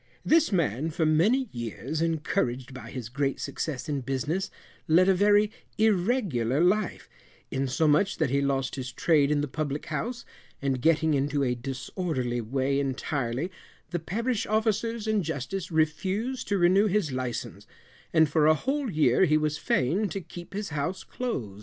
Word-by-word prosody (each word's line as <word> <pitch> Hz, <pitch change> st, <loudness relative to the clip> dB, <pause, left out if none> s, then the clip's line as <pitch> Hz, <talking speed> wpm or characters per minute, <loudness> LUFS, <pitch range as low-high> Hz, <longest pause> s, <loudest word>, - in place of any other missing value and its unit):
This 320 Hz, -5 st, +4 dB
man 155 Hz, -, 0 dB
for 160 Hz, 0 st, 0 dB
many 205 Hz, +13 st, +3 dB
years, 120 Hz, +5 st, -4 dB
encouraged 135 Hz, -6 st, -1 dB
by 120 Hz, -2 st, -9 dB
his 125 Hz, -3 st, -6 dB
great 135 Hz, +3 st, -1 dB
success 130 Hz, -6 st, -4 dB
in 145 Hz, -3 st, -1 dB
business, 140 Hz, +9 st, -2 dB, 0.4 s
led 180 Hz, +3 st, +5 dB
a 195 Hz, -, +6 dB
very 205 Hz, +2 st, +4 dB, 0.3 s
irregular 190 Hz, -, +1 dB
life, 185 Hz, +4 st, +1 dB, 0.4 s
insomuch 150 Hz, +7 st, +2 dB
that 155 Hz, -6 st, 0 dB
he 140 Hz, 0 st, +2 dB
lost 135 Hz, -1 st, 0 dB
his 130 Hz, -1 st, -4 dB
trade 145 Hz, +1 st, +3 dB
in 150 Hz, -1 st, +2 dB
the 145 Hz, -, -1 dB
public 145 Hz, +1 st, -3 dB
house, 230 Hz, -, -4 dB, 0.3 s
and 135 Hz, -2 st, -1 dB
getting 160 Hz, 0 st, +3 dB
into 140 Hz, 0 st, +1 dB
a 125 Hz, -2 st, +1 dB
disorderly 125 Hz, 0 st, -3 dB
way 135 Hz, +4 st, 0 dB
entirely, 135 Hz, +2 st, -2 dB, 0.4 s
the 175 Hz, -, -1 dB
parish 230 Hz, +7 st, -2 dB
officers 220 Hz, +1 st, 0 dB
and 215 Hz, -3 st, +1 dB
justice 165 Hz, +4 st, -4 dB
refused 185 Hz, -, 0 dB
to 200 Hz, -, +1 dB
renew 190 Hz, +4 st, +4 dB
his 195 Hz, -7 st, +1 dB
license, 130 Hz, -2 st, -4 dB, 0.4 s
and 160 Hz, -1 st, +5 dB
for 150 Hz, 0 st, +3 dB
a 155 Hz, -, +6 dB
whole 270 Hz, -, -1 dB
year 155 Hz, +2 st, +4 dB
he 155 Hz, -2 st, +3 dB
was 150 Hz, -1 st, -1 dB
fain 180 Hz, +12 st, +1 dB
to 195 Hz, -, -3 dB
keep 175 Hz, +1 st, -10 dB
his 205 Hz, 0 st, -3 dB
house 155 Hz, +5 st, -3 dB
close. 120 Hz, -, -4 dB
155 Hz, 160 wpm, -27 LUFS, 135-195 Hz, 0.4 s, a